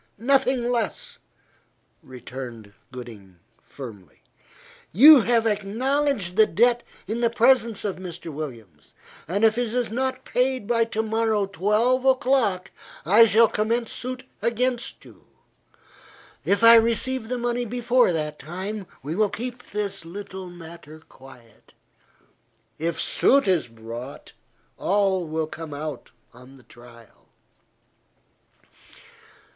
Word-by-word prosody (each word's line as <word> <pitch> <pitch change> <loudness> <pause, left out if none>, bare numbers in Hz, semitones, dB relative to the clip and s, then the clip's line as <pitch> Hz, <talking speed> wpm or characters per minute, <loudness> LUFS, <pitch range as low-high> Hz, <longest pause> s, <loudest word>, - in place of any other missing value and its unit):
Nothing 255 0 +1
less," 230 -4 -3 0.8
returned 125 -4 -10 0.2
Gooding 110 -7 -11 0.2
firmly. 105 - -12 0.7
"You 280 - +9
have 230 0 +1
acknowledged 220 0 -1
the 220 -1 +6
debt 240 +6 +2 0.2
in 220 +4 -3
the 235 - +3
presence 235 -2 +2
of 200 - -2
Mr. 175 -3 -8
Williams, 115 - -9 0.3
and 200 +6 +1
if 220 +2 +3
it 240 -1 -2
is 245 -3 -1
not 260 +2 -2
paid 255 -2 0
by 230 +1 +2
to 220 -1 -2
morrow 220 -2 0
twelve 210 +7 +1
o'clock, 255 -8 +1 0.3
I 215 +7 +6
shall 225 +2 +5
commence 230 +2 -1
suit 255 +1 -4 0.2
against 245 +1 -1
you. - - -18 1.2
If 200 +3 +1
I 230 0 +9
receive 230 +2 0
the 250 - -2
money 240 0 -1
before 245 -1 +2
that 150 -2 -3
time, 190 +5 -6 0.2
we 150 +3 -4
will 210 +3 +1
keep 245 +3 -7
this 200 -2 -4
little 190 +1 -8
matter 165 -2 -12
quiet; 125 -4 -18 1.1
if 165 +1 -2
suit 275 -4 +3
is 180 -9 +1
brought, 115 +3 -10 0.4
all 190 -3 +1
will 160 0 -2
come 155 -1 -8
out 150 -2 -6 0.2
on 125 +2 -16
the 130 - -19
trial." 120 -2 -18
205 Hz, 120 wpm, -24 LUFS, 155-240 Hz, 1.2 s, You